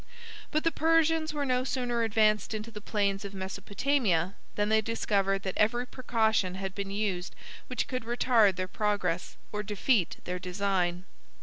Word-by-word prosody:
But 310 0 0
the 330 - +3
Persians 325 0 +3
were 295 -2 -2
no 255 -1 +1
sooner 245 -3 -1
advanced 215 -1 +2
into 215 +2 -5
the 210 -1 -8
plains 200 -2 0
of 200 0 -7
Mesopotamia, 195 - 0 0.2
than 205 0 +1
they 220 0 +4
discovered 195 -3 0
that 190 - -3
every 240 +3 +2
precaution 220 -7 0
had 190 0 -4
been 200 -1 -4
used 195 -3 -2 0.3
which - - -2
could 255 -3 -3
retard 235 -4 +4
their 185 +1 -2
progress, 185 -4 -1
or 210 - -2
defeat 210 -1 +1
their 180 0 -3
design. 180 -1 -1
210 Hz, 160 wpm, -29 LUFS, 195-240 Hz, 0.3 s, they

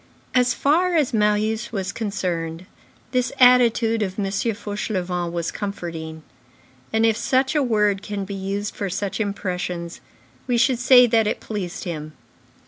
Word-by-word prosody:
As 250 -1 +3
far 345 +5 +2
as 300 -7 +2
Marius 215 +2 +1
was 195 -3 -3
concerned, 180 -6 -3 0.5
this 255 -1 0
attitude 235 -3 +5
of 190 -2 -2
M. 205 - -1
Fauchelevent 200 -4 -2
was 170 -1 -2
comforting, 165 -6 -6 0.7
and, 220 0 +2
if 225 -1 +3
such 260 +3 +1
a 300 - +2
word 210 -6 +2
can 205 -2 -4
be 200 - -6
used 200 +1 -3
for 200 - -3
such 195 +3 -3
impressions, 180 -4 -3 0.5
we 245 -2 +1
should 250 0 +3
say 250 0 +7
that 225 -2 +2
it - - -1
pleased 195 -5 -5
him. 155 -4 -5
210 Hz, 145 wpm, -22 LUFS, 185-235 Hz, 0.7 s, say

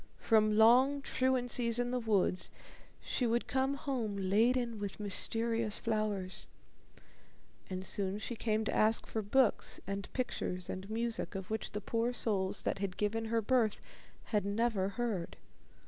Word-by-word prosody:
From 215 -2 +3
long 260 +6 +5
truancies 245 -3 +1
in 245 0 0
the 250 - 0
woods 205 -5 +1 0.5
she 250 - -1
would 235 +1 +1
come 265 +1 0
home 250 -8 -3
laden 225 +4 +2
with 200 0 -5
mysterious 225 +2 +1
flowers, 210 -4 -2 1.2
and 185 0 -4
soon 195 0 0
she 235 +3 -5
came 220 -1 0
to - - -1
ask 220 +1 +3
for 220 - -3
books 220 +3 +2
and 195 +1 -4
pictures 180 -8 -3
and 190 +2 -6
music, 230 -1 -2
of 190 +1 -5
which 220 - -3
the 210 - -3
poor 230 +4 -1
souls 195 -5 -1
that - - -1
had 195 -2 -3
given 225 +2 -1
her 225 0 0
birth 230 -2 +2 0.4
had 210 -3 0
never 200 -1 0
heard. 210 -6 -3
220 Hz, 145 wpm, -33 LUFS, 200-240 Hz, 1.2 s, long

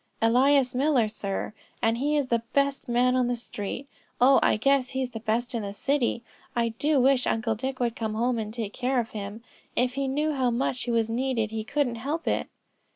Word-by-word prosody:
"Elias 255 +3 +4
Miller, 260 -3 +3
sir; 210 -1 -4 0.3
and 225 +1 +1
he 295 +3 +1
is 280 -3 0
the 235 -1 +2
best 280 -2 +1
man 250 +1 +3
on 250 -1 +2
the 245 - 0
street; 235 +2 -6 0.3
oh 265 +2 +6
I - - +3
guess 270 +2 +2
he's 260 -1 -2
the 225 - -6
best 235 +2 -1
in 230 - -1
the 200 -1 -5
city. 240 +1 0 0.3
I 235 -1 +2
do 285 +6 +1
wish 260 0 +3
Uncle 225 0 +1
Dick 260 +4 -4
would 235 -2 0
come 220 -1 -3
home 235 +1 +1
and 215 -1 -4
take 220 -3 -4
care 255 0 0
of 230 -1 -3
him. 210 +1 -6 0.3
If 250 0 +1
he 275 0 -1
knew 300 +3 0
how 260 -3 +1
much 250 +1 -1
he - - -4
was 230 -1 +2
needed 230 -2 -1
he 220 -1 -3
couldn't 270 -1 -1
help 295 +8 -3
it." - - 0
245 Hz, 215 wpm, -27 LUFS, 225-270 Hz, 0.3 s, oh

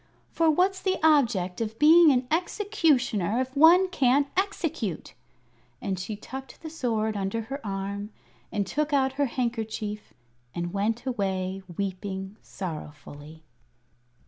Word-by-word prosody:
"For 330 -1 +2
what's 375 +4 +2
the 375 -1 0
object 235 - +3
of 220 0 -3
being 320 +2 +7
an 255 -1 +1
Executioner 300 - +1
if 260 +1 -3
one 340 +6 +7
can't 280 -4 +3
execute?" 325 - -2 0.7
And 190 -2 -3
she 210 +4 -4
tucked 265 +9 -9
the 315 - -6
sword 220 -8 -1
under 200 +3 -2
her 275 +4 -7
arm 200 0 -4 0.4
and 205 -2 -1
took 300 +5 -2
out 265 -1 +2
her 285 0 0
handkerchief 220 - -3 0.4
and 175 +1 -3
went 220 +5 -1
away 195 -5 -2 0.2
weeping 195 +1 -4
sorrowfully. 155 -3 -8
230 Hz, 125 wpm, -26 LUFS, 195-295 Hz, 0.7 s, being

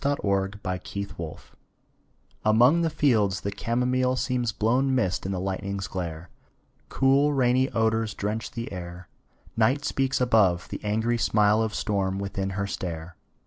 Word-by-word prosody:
THE 140 0 +1
WINDOW 100 0 0
ON 90 -1 -2
THE 100 +1 -6
HILL 80 -2 -6 1.1
Among 120 +10 +5
the 165 - +1
fields 110 -11 +2
the 100 - -3
camomile 125 +4 0
Seems 125 -2 -1
blown 125 +6 +1
mist 95 -7 0
in - - -2
the 95 - -2
lightning's 95 +1 -3
glare: 85 -2 -5 0.6
Cool, 140 +2 +3
rainy 130 0 +2
odors 110 -1 0
drench 105 +2 -3
the 115 0 -6
air; 90 -1 -8 0.5
Night 130 +6 +2
speaks 135 -1 0
above; 105 -8 +3
the - - -6
angry 110 +3 0
smile 105 0 +3
Of 110 -2 -2
storm 95 -2 -1
within 100 0 -3
her 100 - 0
stare. 85 -5 -5
105 Hz, 150 wpm, -26 LUFS, 95-125 Hz, 1.1 s, Among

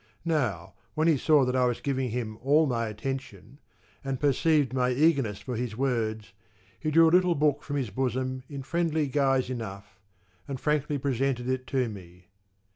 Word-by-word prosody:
Now 150 -11 -1 0.2
when 155 +1 +2
he 165 - +5
saw 145 0 +4
that 125 0 -1
I 130 -1 +3
was 120 - -1
giving 135 -2 -1
him 110 -2 -4
all 145 +7 +3
my 115 -4 -1
attention, 115 +1 -6 0.4
and 135 -2 -3
perceived 145 -1 +2
my 125 -1 +1
eagerness 135 -6 +2
for 125 - -5
his 115 -1 -4
words, 110 -7 -1 0.5
he 155 - -2
drew 165 +2 +6
a - - +3
little 180 -1 +4
book 145 -1 +1
from 145 - -5
his 130 -7 -2
bosom 130 +2 -2
in 140 -2 -6
friendly 160 +1 0
guise 135 -2 +1
enough, 100 -5 -7 0.5
and 135 -2 -5
frankly 150 0 0
presented 130 -2 -1
it 130 -1 -2
to 130 -2 0
me. 90 -3 -11
130 Hz, 175 wpm, -27 LUFS, 120-145 Hz, 0.5 s, drew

